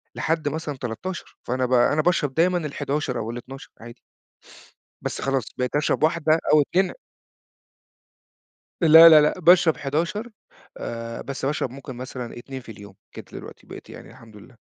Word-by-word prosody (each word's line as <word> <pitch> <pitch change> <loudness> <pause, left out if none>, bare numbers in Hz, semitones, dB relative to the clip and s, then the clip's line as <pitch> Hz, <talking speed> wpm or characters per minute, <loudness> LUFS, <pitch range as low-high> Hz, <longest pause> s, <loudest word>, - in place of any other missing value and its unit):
لحد 160 -2 -1
مثلًا 150 -2 -5
13، 135 +10 -7
فأنا 130 +1 -1
ب 130 - -2
أنا 140 +5 +3
باشرب 150 -5 0
دايمًا 175 +4 +2
ال11 145 -4 -3
أو 115 +1 -4
ال12 130 +3 -10
عادي. 115 0 -12 1.0
بس - - -5
خلاص، 135 -3 0
بقيت 125 +1 -2
أشرب 150 +1 0
واحدة 160 0 +2
أو 155 - +6
2 185 +6 0 1.9
لا، 165 +1 +9
لا، 155 -1 +8
لأ، 150 +5 0
باشرب 175 -1 +5
11، 170 - -3 0.5
آآ، 115 0 -6
بس 140 -1 -6
باشرب 145 -2 -1
ممكن 130 -1 -9
مثلًا 125 -1 -7
2 130 +2 -8
في 120 - -11
اليوم، 100 -2 -13 0.2
كده - - -10
دلوقتي - - -11
بقيت - - -11
يعني - - -12
الحمد 115 -2 -17
لله. 120 +5 -16
140 Hz, 155 wpm, -23 LUFS, 125-160 Hz, 1.9 s, لا